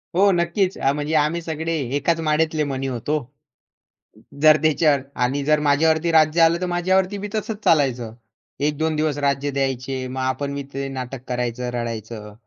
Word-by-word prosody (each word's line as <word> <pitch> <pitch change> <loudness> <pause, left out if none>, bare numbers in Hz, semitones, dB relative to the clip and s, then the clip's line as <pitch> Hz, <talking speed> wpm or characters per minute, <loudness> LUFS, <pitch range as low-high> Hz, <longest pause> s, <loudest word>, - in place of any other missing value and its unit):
हो 200 +1 +5
नक्कीच 185 +2 0
म्हणजे 145 +3 -1
आम्ही 155 +3 +1
सगळे 160 0 -3 0.2
एकाच 165 +3 +1
माळेतले 155 0 +1
मणी 135 0 -3
होतो. 130 +4 -2 1.2
जर 155 0 +7
त्याच्यावर 150 -3 +3 0.2
आणि 135 +3 0
जर 150 0 +3
माझ्यावरती 160 +3 +3
राज्य 160 +1 +4
आलं 165 +1 +4
तर 185 - 0
माझ्यावरती 185 +3 +1
बी 205 - -4
तसंच 215 0 -3
चालायचं. 125 -7 +2 0.5
1-2 150 +2 0
दिवस 150 -1 0
राज्य 140 +1 0
द्यायचे 130 -1 -2
मग 130 +1 -5
आपण 140 +2 -2
बी 140 - -4
ते 135 0 -3
नाटक 130 0 -6
करायचं 125 0 -2
रडायचं. 110 -3 -5
145 Hz, 155 wpm, -22 LUFS, 130-160 Hz, 1.2 s, जर